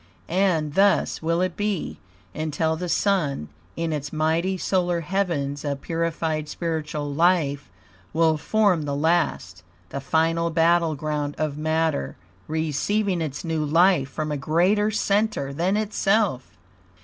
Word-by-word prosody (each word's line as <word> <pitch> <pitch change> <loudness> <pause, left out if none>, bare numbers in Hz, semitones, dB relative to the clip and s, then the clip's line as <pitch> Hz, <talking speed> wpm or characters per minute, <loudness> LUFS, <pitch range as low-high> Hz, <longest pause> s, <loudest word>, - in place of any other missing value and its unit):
And 170 -5 +1
thus 195 +3 +2
will 165 +2 0
it 185 -2 -1
be, 205 -4 -2 0.3
until 160 +1 -1
the 175 +2 -4
Sun, 150 - 0 0.3
in 165 -1 -2
its 145 -1 -4
mighty 165 +4 0
solar 180 -2 0
heavens 155 -6 -1
of 140 -2 -3
purified 165 -2 -2
spiritual 150 -3 -3
life, 150 - +2 0.4
will 160 -1 +3
form 185 0 +1
the 140 -1 -2
last, 150 - 0 0.3
the 140 - -5
final 165 +3 +1
battle 165 -1 +3
ground 145 0 -3
of 155 -2 -1
matter, 155 - -1 0.3
receiving 165 +5 0
ITS 150 -3 -4
NEW 160 -2 -1
LIFE 165 -2 +3
FROM 155 0 -4
A 150 - -1
GREATER 180 +9 +2
CENTER 205 -8 0
THAN 180 +7 +1
ITSELF. 205 - 0
160 Hz, 130 wpm, -24 LUFS, 150-180 Hz, 0.4 s, will